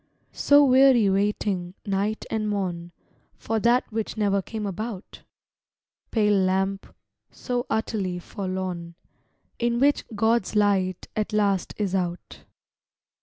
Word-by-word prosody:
So 285 Hz, 0 st, +5 dB
weary 255 Hz, -5 st, +5 dB
waiting, 195 Hz, -2 st, -1 dB
night 200 Hz, +2 st, -1 dB
and 215 Hz, -1 st, -1 dB
morn, 175 Hz, -4 st, -3 dB, 0.5 s
For 225 Hz, 0 st, -2 dB
that 240 Hz, +3 st, +3 dB
which 220 Hz, 0 st, -3 dB
never 200 Hz, -2 st, +1 dB
came 215 Hz, +2 st, -5 dB
about! 200 Hz, +1 st, -6 dB, 0.9 s
Pale 210 Hz, -3 st, +2 dB
lamp, 190 Hz, +1 st, -1 dB, 0.3 s
so 245 Hz, 0 st, -4 dB
utterly 210 Hz, -5 st, -1 dB
forlorn. 185 Hz, -2 st, -5 dB, 0.6 s
In 235 Hz, 0 st, +1 dB
which 285 Hz, +2 st, +3 dB
God's 225 Hz, 0 st, +1 dB
light 195 Hz, -3 st, +1 dB
at 215 Hz, 0 st, -2 dB
last 200 Hz, -3 st, +1 dB
is 200 Hz, -3 st, -2 dB
out. 180 Hz, -2 st, -4 dB
205 Hz, 115 wpm, -25 LUFS, 190-220 Hz, 0.9 s, So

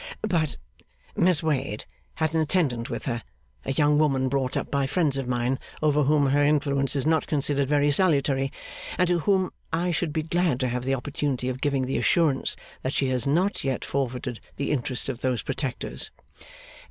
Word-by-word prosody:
' -, -, -32 dB
But, 170 Hz, -8 st, 0 dB, 0.6 s
Miss 175 Hz, -4 st, +3 dB
Wade 135 Hz, -8 st, -1 dB, 0.3 s
had 160 Hz, 0 st, 0 dB
an 160 Hz, -, +2 dB
attendant 145 Hz, -8 st, +1 dB
with -, -, -5 dB
her 120 Hz, -2 st, -2 dB, 0.4 s
a -, -, -1 dB
young 145 Hz, +1 st, +3 dB
woman 135 Hz, -4 st, +2 dB
brought 135 Hz, -1 st, -1 dB
up -, -, -3 dB
by 140 Hz, -1 st, +1 dB
friends 150 Hz, -2 st, +1 dB
of 135 Hz, -2 st, -3 dB
mine, 125 Hz, +1 st, 0 dB, 0.2 s
over 150 Hz, -1 st, +3 dB
whom 145 Hz, -1 st, +3 dB
her 145 Hz, +1 st, +3 dB
influence 140 Hz, -2 st, +2 dB
is 140 Hz, -, 0 dB
not 160 Hz, -1 st, +2 dB
considered 140 Hz, -2 st, +1 dB
very 145 Hz, 0 st, +3 dB
salutary, 140 Hz, -5 st, +2 dB, 0.5 s
and 180 Hz, -, +3 dB
to 175 Hz, -1 st, +2 dB
whom 190 Hz, +1 st, +1 dB, 0.2 s
I 170 Hz, +2 st, 0 dB
should 165 Hz, -1 st, -1 dB
be 155 Hz, 0 st, -1 dB
glad 170 Hz, -4 st, +1 dB
to 130 Hz, -, +1 dB
have 125 Hz, +1 st, -3 dB
the 135 Hz, 0 st, +2 dB
opportunity 135 Hz, -1 st, -2 dB
of 130 Hz, +1 st, -5 dB
giving 140 Hz, -3 st, +1 dB
the 130 Hz, +1 st, -1 dB
assurance 155 Hz, -6 st, +2 dB, 0.3 s
that 130 Hz, -, -2 dB
she 135 Hz, -, +1 dB
has 130 Hz, 0 st, 0 dB
not 180 Hz, +8 st, +1 dB
yet 135 Hz, -2 st, -1 dB
forfeited 125 Hz, -3 st, -3 dB, 0.2 s
the 140 Hz, -, -2 dB
interest 125 Hz, -3 st, -1 dB
of 130 Hz, -3 st, -3 dB
those 125 Hz, -4 st, -1 dB
protectors. 135 Hz, -5 st, -2 dB
140 Hz, 190 wpm, -26 LUFS, 130-155 Hz, 0.6 s, Miss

